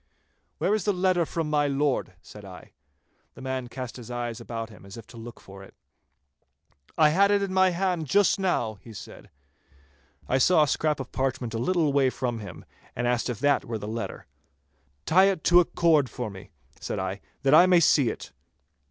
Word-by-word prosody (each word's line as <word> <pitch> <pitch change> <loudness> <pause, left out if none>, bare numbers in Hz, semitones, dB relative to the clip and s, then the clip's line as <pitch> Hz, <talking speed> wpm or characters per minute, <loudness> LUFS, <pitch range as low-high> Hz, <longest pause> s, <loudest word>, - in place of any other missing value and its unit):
'Where - - 0
is 215 -4 -1
the 205 - +2
letter 180 -2 +1
from 165 -2 -3
my 150 -1 +1
Lord?' 140 0 -1
said - - -13
I. - - -12 0.6
The - - -12
man 130 -1 -3
cast 125 0 -7
his 120 -2 -11
eyes 120 -2 -4
about 115 -1 -6
him 105 - -15
as 100 +2 -11
if 115 - -10
to 120 - -16
look 115 +1 -10
for 95 0 -13
it. 95 - -15 1.2
'I 155 -1 +5
had 195 +6 +3
it 205 -1 +2
in 195 -1 -3
my 190 0 +4
hand 180 -3 -1
just 200 +5 +3
now,' 120 - -1
he 115 - -12
said. - - -11 1.0
I 130 - +1
saw 160 +3 +5
a - - 0
scrap 150 +1 0
of 130 -2 -7
parchment 130 -3 -2
a 115 - -2
little 160 +1 +1
way 135 -2 +3
from 125 -3 -3
him, 100 -4 -10 0.3
and 120 - -2
asked 120 0 0
if 120 - -3
that 145 -1 +2
were 115 -1 -4
the 105 - -7
letter. 115 +2 -5 0.8
'Tie 185 +4 +5
it 195 -4 0
to 175 0 +6
a 175 - +3
cord 155 -7 +2
for 120 -4 -5
me,' 95 -1 -12 0.3
said - - -4
I, 95 +1 -4 0.2
'that 135 +1 +3
I 175 +4 +8
may 180 -1 +5
see 145 -6 +4
it. - - -8
135 Hz, 205 wpm, -26 LUFS, 115-175 Hz, 1.2 s, I